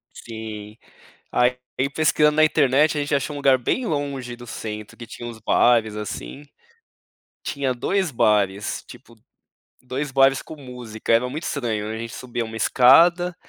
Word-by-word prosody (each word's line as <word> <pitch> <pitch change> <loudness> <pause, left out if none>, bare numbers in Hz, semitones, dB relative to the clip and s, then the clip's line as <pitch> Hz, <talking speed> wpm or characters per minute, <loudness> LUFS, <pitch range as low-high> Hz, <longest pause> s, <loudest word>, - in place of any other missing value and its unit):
Sim. 110 -1 -8 0.5
Aí, 125 +1 +2 0.4
pesquisando 150 -1 +3
na 155 - +5
internet, 150 0 +3
a - - 0
gente 145 0 0
achou 140 +2 -2
um - - -5
lugar 135 -2 +4
bem 235 - -1
longe 140 - -3
do 120 0 -12
centro, 110 -1 -7
que 120 - -10
tinha 120 +2 -8
uns 115 -2 -9
bares, 110 -1 +3
assim, 105 - -6 1.0
tinha 140 -3 -2
2 190 +7 -1
bares, 105 -4 +1
tipo, 115 0 -15 0.6
2 135 +3 -4
bares 135 0 +3
com 160 - -10
música, 125 -5 -5
era 120 +2 +3
muito 155 +6 -6
estranho, 115 -7 -2
a 110 - -4
gente 115 +1 -6
subia 120 -2 -4
uma 110 0 -8
escada, 170 +10 +5
125 Hz, 155 wpm, -22 LUFS, 110-145 Hz, 1.0 s, na